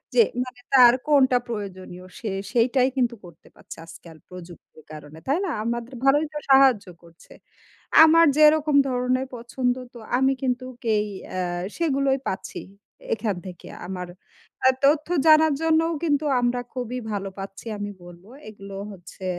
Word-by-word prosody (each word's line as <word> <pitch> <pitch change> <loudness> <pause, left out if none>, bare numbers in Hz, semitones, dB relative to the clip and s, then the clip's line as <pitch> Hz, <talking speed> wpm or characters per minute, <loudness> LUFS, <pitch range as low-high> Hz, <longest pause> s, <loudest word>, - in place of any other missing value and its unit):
যে 470 - +7 0.2
মানে 250 -1 -12
তার 245 -2 +8
কোনটা 260 -4 +4
প্রয়োজনীয় 185 -4 -7
সে 220 - -4 0.2
সেইটাই 250 +2 +2
কিন্তু 240 -2 +1
করতে 170 -2 -16
পারছে - - -12
আজকাল 165 -1 -14
প্রযুক্তির 175 -3 -13
কারণে। 155 +1 -11
তাই 280 +5 +2
না? 375 - -3 0.2
আমাদের 235 +2 -4
ভালোই 290 +3 +4
তো - - -4
সাহায্য 265 -6 +5 0.2
করছে। 170 0 -20 0.7
আমার 330 +1 +6
যেরকম 305 -1 +4
ধরনের 255 +1 -1
পছন্দ 245 +1 -2 0.2
তো 240 - -11 0.2
আমি 265 +1 +3
কিন্তু 255 0 -1 0.2
কেই 215 -1 +1 0.3
আ - - -1 0.4
সেগুলোই 275 -4 +1
পাচ্ছি 190 - -5 0.5
এখান 215 -3 -2
থেকে 180 -2 -11 0.2
আমার 180 -1 -6 0.5
অ্যা 260 - +5
তথ্য 300 +1 +3 0.2
জানার 310 0 +6
জন্যও 325 +1 +2
কিন্তু 300 -2 +1 0.2
আমরা 245 0 0
খুবই 250 0 -4
ভালো 200 -1 -3
পাচ্ছি 195 +2 -9
আমি 205 0 -5
বলবো। 175 +3 -15 0.2
এগুলো 195 -2 -11 0.2
হচ্ছে 180 0 -12
245 Hz, 145 wpm, -23 LUFS, 195-275 Hz, 0.7 s, তার